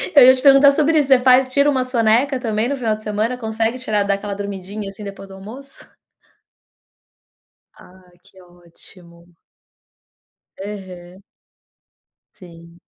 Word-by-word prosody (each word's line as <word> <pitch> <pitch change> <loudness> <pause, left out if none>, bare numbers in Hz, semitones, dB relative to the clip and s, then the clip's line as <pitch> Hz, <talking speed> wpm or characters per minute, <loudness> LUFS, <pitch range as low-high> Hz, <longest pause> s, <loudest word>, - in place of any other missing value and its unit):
Eu 275 -3 +8
ia 260 +1 +7
te 255 - -8
perguntar 280 0 +6
sobre 310 +2 +1
isso, 290 -3 +1
você 265 -2 +5
faz 255 +1 +3
tira 280 +1 +3
uma 260 -3 0
soneca 255 +2 +1
também 225 -1 -2
no 280 - -2
final 230 -5 -2
de 215 - -17
semana, 215 +4 -2
consegue 225 +1 -3
tirar 215 -5 -1
dar 200 0 0
aquela 200 +1 -6
dormidinha, 200 0 -7
assim, 200 +2 -12
depois 195 -1 -10
do 195 - -13
almoço? 245 +8 -13 1.9
Ah 185 0 -20
que 190 - -21
ótimo. 175 0 -21 1.3
Aham. 185 -2 -10 1.1
Sim. 170 -1 -16
215 Hz, 140 wpm, -19 LUFS, 190-255 Hz, 1.9 s, Eu